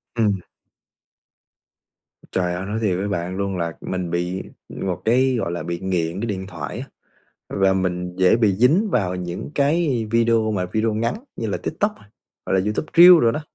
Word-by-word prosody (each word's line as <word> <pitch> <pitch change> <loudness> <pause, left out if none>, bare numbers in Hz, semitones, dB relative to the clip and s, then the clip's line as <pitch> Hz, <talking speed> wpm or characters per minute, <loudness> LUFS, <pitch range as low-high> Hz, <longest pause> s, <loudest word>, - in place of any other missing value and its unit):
Ừm. 105 -4 +1 1.9
Trời 90 -1 0
ơi, 90 +2 -4
nói 105 +3 -3
thiệt 100 -5 0
với 100 +2 -2
bạn 90 -2 -3
luôn 100 -1 -2
là 85 -1 -2
mình 90 -2 -3
bị 90 +2 -2 0.3
một 90 -2 -4
cái, 130 +3 +3
gọi 85 - -2
là, 85 - -4
bị 85 0 -4
nghiện 90 -2 -1
cái 115 - -2
điện 95 -3 -4
thoại 80 -6 -6
á - - -7 0.6
và 95 -1 +2
mình 90 -1 -2
dễ 95 +3 +4
bị 110 -4 +3
dính 155 - +3
vào 90 - 0
những 90 +6 -5
cái 140 -5 +1
video 115 -1 +2
mà 95 -3 -1
video 110 0 +1
ngắn 115 +2 0 0.2
như 115 - -3
là 100 - -1
TikTok, 205 +7 -2 0.5
hoặc - - -2
là 95 - +4
YouTube 105 +10 -2
Reels 175 0 +10
đồ 115 - +5
đó. 115 - -3
100 Hz, 185 wpm, -22 LUFS, 90-115 Hz, 1.9 s, Reels